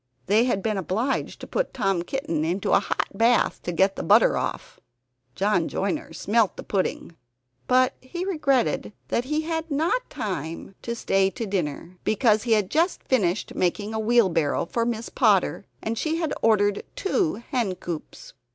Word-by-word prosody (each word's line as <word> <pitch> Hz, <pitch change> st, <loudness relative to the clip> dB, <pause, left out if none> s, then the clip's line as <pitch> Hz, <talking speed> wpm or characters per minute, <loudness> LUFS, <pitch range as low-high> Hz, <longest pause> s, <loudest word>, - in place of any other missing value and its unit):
They 215 Hz, +5 st, +4 dB
had 200 Hz, -6 st, 0 dB
been 215 Hz, -2 st, 0 dB
obliged 220 Hz, -, -2 dB
to -, -, -7 dB
put -, -, -2 dB
Tom 195 Hz, -7 st, +1 dB
Kitten 175 Hz, -, -2 dB
into 175 Hz, +4 st, -1 dB
a -, -, +6 dB
hot -, -, -2 dB
bath 230 Hz, +4 st, +2 dB
to 175 Hz, -, -3 dB
get 190 Hz, +3 st, +2 dB
the -, -, -2 dB
butter -, -, +5 dB
off. -, -, -4 dB, 0.6 s
John 195 Hz, -4 st, +1 dB
Joiner 300 Hz, +11 st, -2 dB
smelt 220 Hz, -1 st, +1 dB
the -, -, -6 dB
pudding; 185 Hz, -3 st, -2 dB, 0.5 s
but 255 Hz, 0 st, +4 dB
he 345 Hz, +8 st, -5 dB
regretted 270 Hz, -, +1 dB, 0.2 s
that 240 Hz, -, 0 dB
he 300 Hz, +3 st, 0 dB
had 325 Hz, 0 st, -3 dB
not 320 Hz, -, 0 dB
time 170 Hz, -2 st, -5 dB
to 235 Hz, -, -4 dB
stay 195 Hz, -4 st, +2 dB
to 230 Hz, +3 st, -5 dB
dinner, 180 Hz, -2 st, -3 dB
because 215 Hz, -1 st, +3 dB
he 230 Hz, 0 st, +1 dB
had 210 Hz, -4 st, +1 dB
just 335 Hz, +4 st, +1 dB
finished 190 Hz, -9 st, 0 dB
making 205 Hz, +4 st, -1 dB
a 220 Hz, -, -1 dB
wheelbarrow 190 Hz, -12 st, +2 dB
for 230 Hz, +6 st, -1 dB
Miss 230 Hz, -1 st, -3 dB
Potter, -, -, +2 dB, 0.2 s
and 225 Hz, 0 st, -2 dB
she 315 Hz, 0 st, 0 dB
had 330 Hz, -2 st, -1 dB
ordered 205 Hz, -2 st, +3 dB
two 385 Hz, -4 st, 0 dB, 0.2 s
hen 235 Hz, -9 st, 0 dB
coops. 175 Hz, -3 st, -7 dB
220 Hz, 170 wpm, -25 LUFS, 190-260 Hz, 0.6 s, a